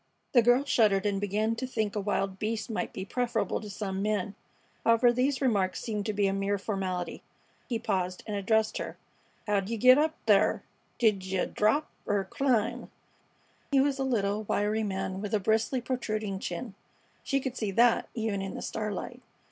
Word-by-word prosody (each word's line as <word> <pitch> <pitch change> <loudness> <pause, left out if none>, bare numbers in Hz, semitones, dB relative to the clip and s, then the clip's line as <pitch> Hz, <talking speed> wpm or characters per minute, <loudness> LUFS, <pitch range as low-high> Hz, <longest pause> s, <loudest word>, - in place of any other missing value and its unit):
The 245 - +6
girl 245 +4 +4
shuddered 210 -8 +3
and 200 -1 0
began 210 +3 0
to 260 - -3
think 220 -5 -2
a - - 0
wild 195 -1 -1
beast 220 +1 -2
might 220 - -2
be 190 - -5
preferable 245 +3 -1
to 210 - -8
some 195 -1 -3
men. 205 -1 -1 0.5
However, 230 +1 +5
these 260 +2 +1
remarks 200 -7 +1
seemed 210 -3 -3
to 215 - 0
be 205 0 +1
a 195 - +2
mere 195 +1 0
formality. 190 -4 -3 0.5
He 235 - 0
paused 185 -5 -2
and 210 - -3
addressed 220 +2 +1
her: - - -5 0.5
"Heow'd 200 -1 +1
yeh 230 - -2
git 255 +5 +7
up 315 +1 +1
thar? - - +4 0.3
D'j'yeh 190 -5 +1
drap 220 +9 +2 0.2
er 205 -1 +1
climb?" 235 -2 0 0.8
He 275 - +4
was 275 0 +2
a - - +1
little, 210 -5 0
wiry 210 +2 0
man 190 -2 -3
with 210 0 -1
a - - +2
bristly, 220 +5 +1
protruding 215 -6 -2
chin. 190 +5 -5 0.5
She 275 - 0
could 260 -2 -4
see 215 -4 -2
that, 235 +4 +3
even 220 -4 -1
in 195 0 -5
the - - -5
starlight. 215 -2 -4
215 Hz, 180 wpm, -29 LUFS, 195-235 Hz, 0.8 s, git